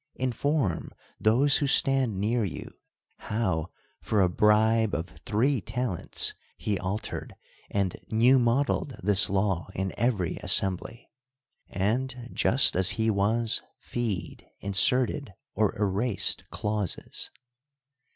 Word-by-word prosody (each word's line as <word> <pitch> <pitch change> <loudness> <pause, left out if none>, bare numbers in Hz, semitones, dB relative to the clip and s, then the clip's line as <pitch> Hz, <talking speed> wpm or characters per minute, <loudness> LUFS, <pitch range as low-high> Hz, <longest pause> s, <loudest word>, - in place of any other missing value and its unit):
Inform 130 - -1 0.3
those 130 +6 +4
who 145 - 0
stand 135 -7 +3
near 115 +3 0
you 95 - -6 0.5
how, 95 -7 -2 0.3
for 105 -2 +1
a 90 - +2
bribe 110 +3 +3
of 85 +2 -4 0.2
three 125 +4 +1
talents, 115 -1 -1 0.2
he 100 -3 -2
altered 95 +4 -5 0.3
and 100 -3 -1
new 120 +4 +4
modeled 130 +3 0
this 100 0 +4
law 95 -3 0
in 95 0 -3
every 105 -7 0
assembly; 95 +5 +1 0.6
and, 120 +5 -2
just 135 +3 +3
as 95 +2 +5
he 110 0 +1
was 110 +3 +1 0.2
feed, 110 -7 -5
inserted 120 +4 +1 0.2
or 110 -2 0
erased 105 +2 +1
clauses. 105 -3 -3
110 Hz, 110 wpm, -27 LUFS, 95-125 Hz, 0.6 s, as